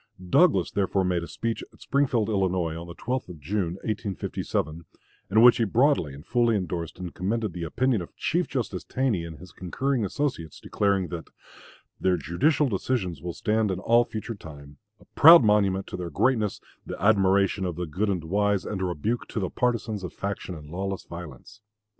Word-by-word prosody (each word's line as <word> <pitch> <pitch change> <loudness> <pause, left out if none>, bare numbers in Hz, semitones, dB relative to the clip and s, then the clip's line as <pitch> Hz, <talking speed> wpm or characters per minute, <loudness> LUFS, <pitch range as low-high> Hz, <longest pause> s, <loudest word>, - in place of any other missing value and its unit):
Douglas, 155 - +4
therefore, 95 -1 +1
made 90 -2 0
a 85 - -6
speech 115 0 -3
at - - -22
Springfield, 135 -6 +1
Illinois, 95 -6 0
on 85 +1 -7
the 85 - -9
12th 125 -2 -3
of 85 -3 -9
June, 85 +3 -2
1857, 95 -6 -3 0.4
in 110 +3 +4
which 120 -1 +8
he 115 - +2
broadly 110 - +2
and 75 +4 -12
fully 120 0 +2
indorsed 90 -4 -3
and 90 -2 -6
commended 105 +1 -2
the 90 - -6
opinion 125 - +1
of 85 - -10
Chief 175 +3 0
Justice 115 -8 -3
Taney 125 -10 -1
and 80 -2 -8
his 90 +1 -13
concurring 125 +9 -2
associates, 100 - -3
declaring 100 -3 0
that 85 -2 -6 0.7
"Their 90 -1 +2
judicial 130 - +1
decisions 95 - -2
will 85 0 -4
stand 110 +3 0
in 95 - -1
all 115 +5 +4
future 115 0 -5
time, 70 -7 -12 0.2
a - - -20
proud 165 -2 +8
monument 100 -3 +2
to - - -6
their 90 -1 -4
greatness, 110 - +1 0.2
the - - -7
admiration 100 -1 +3
of 90 -3 -2
the 90 - -3
good 95 +7 -1
and 90 -4 -1
wise, 100 +3 +1
and 95 -3 -4
a - - +1
rebuke 90 +7 -2
to - - -4
the 95 - -2
partisans 115 -4 -1
of 90 - -6
faction 100 -2 -4
and 75 -1 -11
lawless 95 +2 -3
violence. 85 - -10
95 Hz, 185 wpm, -26 LUFS, 85-115 Hz, 0.7 s, which